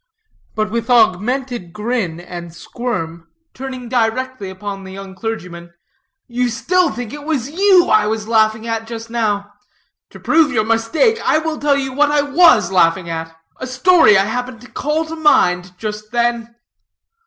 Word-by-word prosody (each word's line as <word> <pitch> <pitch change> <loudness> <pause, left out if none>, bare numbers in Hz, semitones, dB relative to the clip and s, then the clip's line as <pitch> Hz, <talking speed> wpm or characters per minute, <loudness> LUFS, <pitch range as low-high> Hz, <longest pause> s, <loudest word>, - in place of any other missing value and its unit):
But 215 -1 -1
with 230 +1 -3
augmented 240 -2 +1
grin 210 -6 -2
and 175 -1 -9
squirm, 170 -6 -5 0.3
turning 255 -2 -7
directly 245 -2 -1
upon 195 +1 -7
the 190 - -10
young 195 0 -9
clergyman, 180 -5 -6 0.5
"you 245 0 -1
still 350 +9 +1
think 245 -1 -6
it 295 0 -8
was 290 -4 -2
you 375 +1 +4
I 215 -1 +3
was 220 0 -3
laughing 220 0 +2
at, 225 -1 -3
just 230 0 -8
now. 205 -3 -1 0.6
To - - -13
prove 320 -3 +3
your 215 -4 +1
mistake, 230 - +1
I - - +3
will 315 -1 -3
tell 285 -1 +2
you 270 -1 -3
what 290 +2 +3
I 295 -1 +2
was 285 - +4
laughing 170 -1 +2
at; 165 0 -6 0.2
a 260 - -6
story 255 - +5
I 195 - +3
happened 245 +1 -4
to 245 - -15
call 305 +3 -1
to 320 +1 -7
mind 180 - +2
just 215 0 -6
then." 235 0 -1
230 Hz, 165 wpm, -18 LUFS, 200-265 Hz, 0.6 s, story